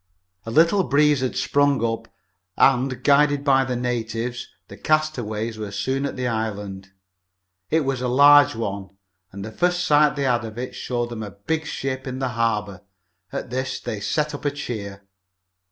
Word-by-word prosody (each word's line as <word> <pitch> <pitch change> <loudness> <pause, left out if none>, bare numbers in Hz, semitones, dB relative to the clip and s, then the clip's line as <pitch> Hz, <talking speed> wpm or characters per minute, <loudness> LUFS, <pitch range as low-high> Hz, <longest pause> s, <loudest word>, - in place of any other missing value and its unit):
A - - -2
little 165 - +4
breeze 150 -1 +3
had 130 - -2
sprung 140 -4 +2
up, 115 0 -3 0.5
and, 130 -1 +2
guided 145 0 +4
by 135 -2 +4
the 125 -1 -3
natives, 120 0 -3 0.2
the - - -11
castaways 115 -8 -1
were 105 -1 -4
soon 135 +7 -2
at - - -6
the 125 -1 -2
island. 105 -4 -4 0.8
It 160 - +2
was 135 -3 -2
a 125 - -1
large 145 +2 +6
one, 100 -3 -5 0.3
and 100 +1 -7
the 110 - -7
first 175 +8 +1
sight 150 -3 +4
they 140 - -2
had 120 -3 +1
of 110 0 -8
it 125 +1 -5
showed 120 -1 -3
them 115 -2 -5
a 105 - -5
big 155 +12 -3
ship 130 0 -4
in 130 0 -4
the 130 -1 -1
harbor. 105 -5 -1 0.5
At - - -5
this 130 +1 -2
they 115 -4 -5
set 150 +8 -1
up 145 - -7
a 145 - +2
cheer. 100 -8 -6
125 Hz, 175 wpm, -23 LUFS, 110-145 Hz, 0.8 s, large